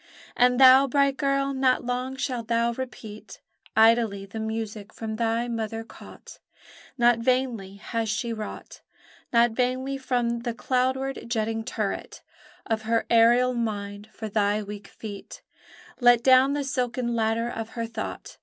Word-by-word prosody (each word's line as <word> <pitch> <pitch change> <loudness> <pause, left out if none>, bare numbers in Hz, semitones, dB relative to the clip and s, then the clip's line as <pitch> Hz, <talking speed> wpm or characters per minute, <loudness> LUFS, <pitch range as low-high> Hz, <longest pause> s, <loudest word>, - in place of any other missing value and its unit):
And 250 +1 +3
thou, 265 +1 +8
bright 280 +1 +2
girl, 275 0 0
not 260 -2 +1
long 250 +2 -2
shalt 250 -4 -3
thou 235 0 +1
repeat 230 -4 -8 0.4
Idly 220 -3 +4
the 200 +3 -8
music 220 -1 -5
from 220 -1 -5
thy 230 +1 0
mother 225 -1 -3
caught; 225 - -14 0.6
Not 240 -1 +4
vainly 235 -5 -1
has 225 +2 -3
she 220 +2 -2
wrought, 215 -1 -8 0.5
Not 235 0 +4
vainly 255 +3 -1
from 245 -2 -1
the 235 -1 -4
cloudward 260 +2 -1
jetting 225 -1 -1
turret 215 -2 -4 0.4
Of 220 -1 -1
her 230 0 +2
aerial 240 +2 +5
mind, 205 -3 -4
for 220 0 -7
thy 210 0 0
weak 205 0 -9
feet, 205 -3 -10 0.6
Let 245 -2 +5
down 260 +1 +5
the 290 0 -1
silken 250 -2 -2
ladder 225 +1 0
of 225 -2 -5
her 230 - -1
thought. 225 -1 -7
235 Hz, 145 wpm, -25 LUFS, 220-255 Hz, 0.6 s, thou